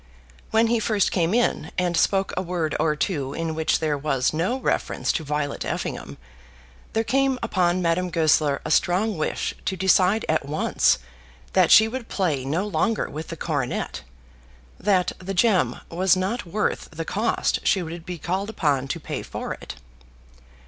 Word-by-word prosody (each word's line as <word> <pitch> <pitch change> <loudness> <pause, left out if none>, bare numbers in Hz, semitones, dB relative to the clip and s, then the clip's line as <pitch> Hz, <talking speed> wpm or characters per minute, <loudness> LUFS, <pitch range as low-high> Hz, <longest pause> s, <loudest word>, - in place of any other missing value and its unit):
When 225 +1 +3
he 230 0 +2
first 210 -3 +1
came 170 -2 +1
in 240 +2 +1
and 180 -1 +1
spoke 195 +3 +2
a - - 0
word 175 -4 -2
or 155 -1 +2
two, 145 -4 -2
in 165 -1 -2
which 160 0 +1
there 155 -2 0
was 135 -3 0
no 180 +11 0
reference - - -1
to 160 - -2
Violet 150 -1 -2
Effingham, - - -4 0.8
there 225 - +1
came 265 +3 +1
upon 185 -4 +1
Madame 175 +2 +1
Goesler 155 -4 +2
a - - -2
strong 200 +4 +2
wish 155 - -2
to 190 - -1
decide 190 +3 +3
at 155 -1 +1
once 145 +3 +2 0.6
that 185 -3 +4
she 220 - +8
would 235 0 -5
play 160 -9 0
no 160 +9 -1
longer 210 +5 0
with 155 +2 -6
the 165 - -7
coronet, 145 -6 -2 0.8
that 185 -2 +2
the 195 +1 -5
gem 195 -1 +2
was 185 +2 +2
not 190 +3 -2
worth 210 +5 -1
the 165 0 -6
cost 215 +7 0
she 190 - +2
would 165 0 -7
be 180 +1 -6
called 190 +6 -2
upon 140 -10 0
to - - -3
pay - - -5
for - - -5
it. - - -9
180 Hz, 170 wpm, -24 LUFS, 155-205 Hz, 0.8 s, she